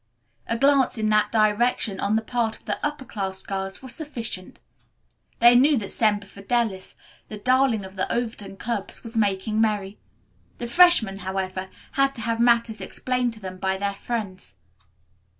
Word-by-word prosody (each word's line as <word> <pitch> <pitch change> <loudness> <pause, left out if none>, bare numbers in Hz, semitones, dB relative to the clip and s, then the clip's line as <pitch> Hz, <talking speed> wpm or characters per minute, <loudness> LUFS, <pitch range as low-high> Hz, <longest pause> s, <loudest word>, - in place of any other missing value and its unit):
A 230 - -1
glance 275 -1 +3
in 215 -1 0
that 210 0 +3
direction 215 -1 +2
on 205 +2 +1
the 220 - +1
part 225 -1 -1
of - - -27
the - - -3
upper 295 -2 -2
class 190 -4 -4
girls 195 +3 -5
was 260 -2 -5
sufficient. 235 - -3 0.8
They 240 +1 +7
knew 275 +4 +5
that 200 -4 -3
Semper 205 -2 +1
Fidelis, 200 0 -2 0.3
the 215 - -7
darling 255 -2 +2
of 190 +1 -12
the 185 - -1
Overton 225 -5 -3
clubs, 215 -2 -4
was 230 0 -8
making 215 0 +1
merry. 210 -2 -1 0.6
The 240 - -4
freshmen, 240 - +5
however, 190 0 -4 0.2
had 275 0 +1
to 230 - -5
have 230 0 -1
matters 235 -3 +2
explained 250 +4 -1
to - - -13
them 185 -2 -8
by 190 0 0
their 200 +1 -1
friends. 195 - -5
220 Hz, 165 wpm, -24 LUFS, 195-240 Hz, 0.8 s, They